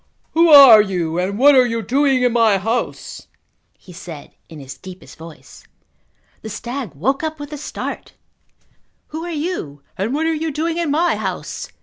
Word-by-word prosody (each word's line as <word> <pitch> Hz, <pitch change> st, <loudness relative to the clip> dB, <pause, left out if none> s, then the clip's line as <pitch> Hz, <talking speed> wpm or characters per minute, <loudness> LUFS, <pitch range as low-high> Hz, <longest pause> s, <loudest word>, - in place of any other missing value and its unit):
"Who 335 Hz, +1 st, +3 dB
are 275 Hz, -8 st, +9 dB
you 175 Hz, -4 st, -3 dB
and 195 Hz, +3 st, -2 dB
what 285 Hz, +4 st, +6 dB
are 260 Hz, -2 st, +6 dB
you 230 Hz, -2 st, -3 dB
doing 265 Hz, +3 st, +1 dB
in 245 Hz, -2 st, +2 dB
my 225 Hz, -4 st, +3 dB
house?" 225 Hz, +6 st, -4 dB, 0.5 s
he 180 Hz, -, -16 dB
said 165 Hz, -3 st, -11 dB, 0.2 s
in 160 Hz, -, -11 dB
his 135 Hz, -1 st, -10 dB
deepest 185 Hz, -1 st, -13 dB
voice. 160 Hz, 0 st, -14 dB, 0.8 s
The 220 Hz, -, -8 dB
stag 235 Hz, -, -6 dB
woke 265 Hz, -, -1 dB
up 315 Hz, -1 st, -5 dB
with 290 Hz, +1 st, -8 dB
a -, -, -5 dB
start. 305 Hz, -, -7 dB, 1.0 s
"Who 315 Hz, +2 st, -6 dB
are 345 Hz, -, -6 dB
you 295 Hz, -, -5 dB, 0.2 s
and 200 Hz, +5 st, -2 dB
what 315 Hz, +2 st, -1 dB
are 325 Hz, -, +1 dB
you 320 Hz, +1 st, -3 dB
doing 325 Hz, +3 st, -3 dB
in 335 Hz, -3 st, -1 dB
my 330 Hz, +5 st, +1 dB
house?" -, -, -6 dB
245 Hz, 180 wpm, -19 LUFS, 190-300 Hz, 1.0 s, are